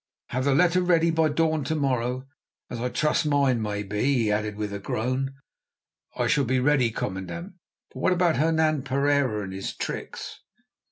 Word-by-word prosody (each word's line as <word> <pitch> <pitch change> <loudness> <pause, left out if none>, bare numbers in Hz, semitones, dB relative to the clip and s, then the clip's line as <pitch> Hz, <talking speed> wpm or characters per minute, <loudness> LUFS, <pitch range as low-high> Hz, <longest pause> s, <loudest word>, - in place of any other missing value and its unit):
Have 130 +1 -1
the 140 -1 +3
letter 180 +3 +4
ready 170 -2 +3
by 160 -1 +2
dawn 160 0 +1
to 160 - -1
morrow 130 -5 0
morning, 130 +1 -5 0.4
as 120 - -4
I 125 - -1
trust 150 +6 +1
mine 140 -5 +2
may 105 -1 -2
be," 105 +1 -3
he 125 -6 +2
added 105 0 -1
with 105 -1 -4
a 100 - -4
groan. 130 +6 -2 0.8
"It - - +2
shall 145 - +3
be 130 +1 +1
ready, 130 -2 +3
commandant; 110 - -5 0.4
but - - -8
what - - +2
about 175 -2 +2
Hernan 155 -1 +2
Pereira 140 -4 +1
and 95 -1 -6
his 95 0 -5
tricks?" - - -6
135 Hz, 180 wpm, -26 LUFS, 115-155 Hz, 0.8 s, letter